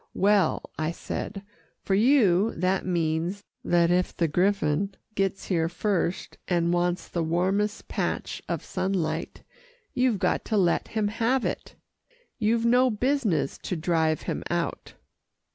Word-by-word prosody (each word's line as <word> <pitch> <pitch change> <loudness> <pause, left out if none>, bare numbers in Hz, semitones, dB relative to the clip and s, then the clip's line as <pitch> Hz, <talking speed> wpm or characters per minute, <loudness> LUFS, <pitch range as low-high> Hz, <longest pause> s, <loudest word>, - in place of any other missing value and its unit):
"Well," 200 0 +2
I 155 0 0
said, 195 +3 -5 0.4
"for 195 - -1
you, 215 -3 +4
that 185 +2 0
means 170 +3 -1 0.2
that 170 -1 +3
if 180 +1 +1
the 170 - +2
griffon 190 +2 +1 0.2
gets 195 -1 -1
here 165 -3 0
first, 180 -1 -2
and 170 -1 +1
wants 175 0 0
the 170 - -2
warmest 190 +6 0
patch - - -3
of - - -3
sunlight, 185 -3 -2 0.5
you've 250 -4 +2
got - - 0
to 220 - 0
let 175 -4 +2
him 215 -2 -1
have 230 +4 0
it. - - -4 0.6
You've 230 +1 +2
no 250 +2 +5
business 220 - 0
to 180 - -4
drive 160 -2 +1
him - - -3
out." - - -3
190 Hz, 135 wpm, -26 LUFS, 170-210 Hz, 0.6 s, no